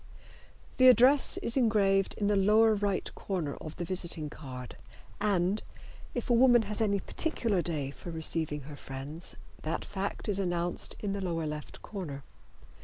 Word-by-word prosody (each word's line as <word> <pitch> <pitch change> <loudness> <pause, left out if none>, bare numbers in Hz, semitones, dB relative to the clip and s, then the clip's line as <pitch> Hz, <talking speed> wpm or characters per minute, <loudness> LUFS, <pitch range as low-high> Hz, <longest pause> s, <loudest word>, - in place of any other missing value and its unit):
The 255 - +7
address 255 +3 +6
is 230 - +2
engraved 205 -6 +2
in 205 - -1
the 205 0 +3
lower 215 +3 +5
right 200 -2 -1
corner 170 -8 -3
of 155 - -7
the 175 - -4
visiting 170 -4 -2
card, 125 -5 -8 0.4
and, 200 -1 +1 0.5
if 245 - -3
a 245 - +3
woman 240 -1 +6
has 210 +2 -2
any 200 -2 +2
particular 230 - 0
day 150 -5 -3
for 175 - -10
receiving 160 -2 -1
her 145 +2 -9
friends, 140 +5 -6 0.3
that 160 +2 -3
fact 200 +3 -4
is 200 -2 +1
announced 175 -2 -1
in 200 -2 -2
the 200 - -3
lower 165 -3 -2
left 150 0 -6
corner. 155 -10 -6
190 Hz, 160 wpm, -30 LUFS, 160-210 Hz, 0.5 s, The